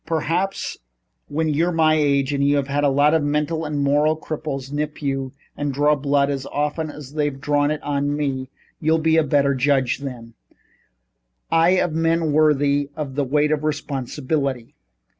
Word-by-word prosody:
Perhaps, 165 +4 -1 0.5
when 160 +2 -1
you're 165 +4 +1
my 160 -2 +3
age 140 -2 +2
and 140 0 0 0.2
have 145 +1 -1
a 145 - +4
lot 145 +3 +3
of 160 - +3
mental 150 +2 -1
and 150 -2 -2
moral 150 +3 +2
cripples 145 -4 -5
nip 150 +1 -3
you 135 -2 -2 0.2
and 145 -1 -2
draw 145 +2 +3
blood 140 0 +1
as 135 -1 -4
often 150 +2 -2
as 145 -2 -10
they've 145 -3 -1
drawn 145 +1 +1
it 155 0 -3
on 145 0 -1
me 135 -3 -2 0.3
you'll 160 +1 +2
be 160 0 +2
a 160 - +4
better 140 -1 +2
judge 135 -1 +1
than 120 -4 -8 1.2
I 165 +1 +4
of 175 -3 0
men 165 0 +1
worthy 145 -2 +2
of 145 -3 -5
the 145 +1 0
weight 150 +3 +1
of 155 -1 0
responsibility. 140 -3 -2
145 Hz, 165 wpm, -22 LUFS, 140-155 Hz, 1.2 s, a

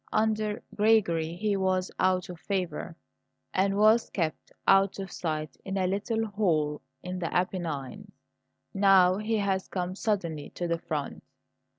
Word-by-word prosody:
Under 215 -1 0
Gregory 180 -7 +2
he 205 +2 0
was 185 -1 0
out 185 -1 +2
of 180 -2 -9
favour, 180 -3 -3 0.6
and 195 +1 +2
was 215 +2 +5
kept 165 -4 -3 0.2
out 195 0 +5
of 195 -2 -6
sight 155 -3 -3
in 195 0 -3
a 185 - +1
little 215 +4 0
hole 165 -8 0 0.2
in 180 0 -4
the 170 - -3
Apennines. 180 +1 -2 0.6
Now 195 -2 +5
he 215 +2 0
has 195 -2 0
come 180 -1 -3
suddenly 175 -9 -2
to 175 - -2
the 170 0 0
front. 150 -4 -4
190 Hz, 145 wpm, -28 LUFS, 170-205 Hz, 0.6 s, was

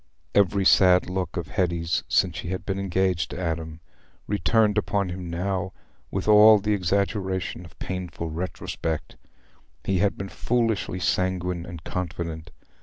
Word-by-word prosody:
Every 100 -1 +3
sad 90 -1 +5
look 95 0 -3
of 85 - -4
Hetty's, 85 -4 0
since - - +2
she - - -5
had 95 +1 -4
been 95 -1 -2
engaged 95 -2 0
to - - -6
Adam, 80 -2 -3 0.4
returned 105 0 +2
upon 100 -2 -1
him 90 -1 -6
now 90 +1 -2 0.4
with - - -3
all 105 +1 +8
the 105 +1 0
exaggeration 95 -1 -1
of 80 - -16
painful 90 -3 -5
retrospect. 80 -2 -4 0.7
He 95 -1 0
had 100 +1 +1
been 95 0 -5
foolishly 115 -6 -1
sanguine 90 0 -1
and 85 -2 -9
confident. 85 -2 -4
90 Hz, 140 wpm, -25 LUFS, 85-100 Hz, 0.7 s, all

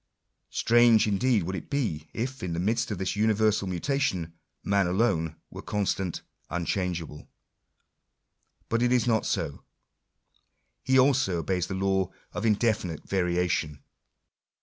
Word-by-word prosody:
Strange 120 -1 +4
indeed 110 +1 +2
would 95 +3 -3
it - - -7
be, 95 - -2
if, 130 +3 -4
in 90 -2 -3
the 85 - -2
midst 115 +6 0
of 105 - -3
this 95 +2 -2
universal 110 -1 +2
mutation, 95 - -1 0.3
man 100 -2 +2
alone 90 -5 +1 0.2
were - - -8
constant, 95 -3 -2 0.3
unchangeable. 85 -3 -3 1.4
But 115 +1 0
it 120 0 +2
is 125 -1 +3
not 110 -3 +1
so. 70 -4 -2 1.2
He 130 0 +3
also 130 -8 +3
obeys 90 +2 -1
the 95 - -4
law 95 -1 +1 0.2
of 105 +2 -1
indefinite 105 -6 0
variation. 90 -6 0
100 Hz, 125 wpm, -27 LUFS, 90-115 Hz, 1.4 s, Strange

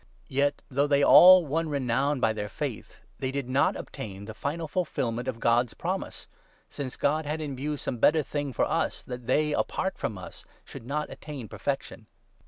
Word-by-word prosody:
Yet, 140 +2 0
though 140 +2 +1
they 140 -1 +3
all 185 +2 +9
won 160 +3 -1
renown 140 0 0
by 110 -3 +2
their 105 -1 -4
faith, - - -6 0.2
they 130 - -2
did 140 0 -3
39 130 - -6
not 140 - +3
obtain 100 -7 -7
the 110 - -7
final 155 +8 -3
fulfilment 125 -8 -2
of 115 -3 -3
God's 120 0 +2
promise; - - -4 0.4
since 135 -3 -6
God 155 +2 +1
40 - - -5
had 155 +1 -2
in 145 -3 -4
view 145 +3 -3
some 125 - -4
better 155 +6 +4
thing 145 -1 -3
for 120 - +1
us, - - -1
that 125 -1 -8
they, 150 +3 +2
apart 190 +5 -1
from 110 -3 -3
us, 90 - -10 0.2
should 115 - -10
not 150 +2 -2
attain 140 -7 -8
perfection. - - -4
140 Hz, 190 wpm, -27 LUFS, 120-150 Hz, 0.4 s, all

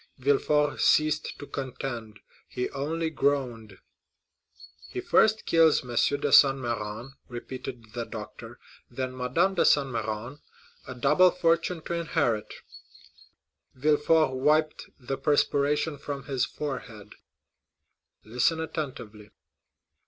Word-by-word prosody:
Villefort 145 +2 +1
ceased 155 0 +2
to - - -9
contend; 125 -6 -6 0.3
he 125 - -4
only 160 +4 -2
groaned. 125 -8 -1 1.1
"He - - -5
first 220 0 +3
kills 165 -2 +4
M. 125 - -12 0.3
de - - 0
Saint 135 -1 +7
Méran," 115 0 -4 0.2
repeated 120 -2 -8
the 120 -1 -4
doctor, 115 +2 -9 0.3
"then 130 +1 -4
Madame 130 +10 +1
de 185 - +2
Saint 140 -2 +3
Méran,—a 120 +3 -7
double 150 +9 +4
fortune 170 -1 0
to - - -4
inherit." 120 -10 -1 1.2
Villefort 150 +2 +3
wiped 150 +4 +1
the 135 +1 -5
perspiration 145 0 +1
from 140 -1 -6
his 130 -3 -1
forehead. 120 -8 -7 1.1
"Listen 125 +9 0
attentively." 130 -10 -6
135 Hz, 105 wpm, -27 LUFS, 120-155 Hz, 1.2 s, Saint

